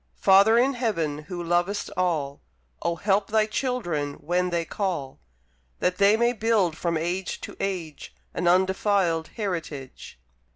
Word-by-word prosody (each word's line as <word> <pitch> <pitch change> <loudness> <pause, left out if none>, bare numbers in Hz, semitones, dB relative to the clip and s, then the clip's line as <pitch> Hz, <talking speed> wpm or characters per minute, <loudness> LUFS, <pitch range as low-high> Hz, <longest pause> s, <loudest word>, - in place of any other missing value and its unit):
Father 200 +4 +6
in 260 +3 +3
Heaven 170 - -1
who 175 -2 -5
lovest 175 +4 0
all, 160 -7 -1 0.4
Oh 170 - 0
help 200 +2 +1
Thy 215 0 +2
children 205 - -2
when 180 +3 -1
they 170 -1 -1
call; 170 -9 -3 0.6
That 180 +1 -1
they 200 +2 +5
may 235 +1 +2
build 215 -7 +1
from 170 0 -1
age 175 +4 -3
to - - -8
age, 175 -6 -4 0.2
An 180 - -2
undefilèd 185 -2 +2
heritage. 160 - -6
180 Hz, 135 wpm, -25 LUFS, 165-205 Hz, 0.6 s, Father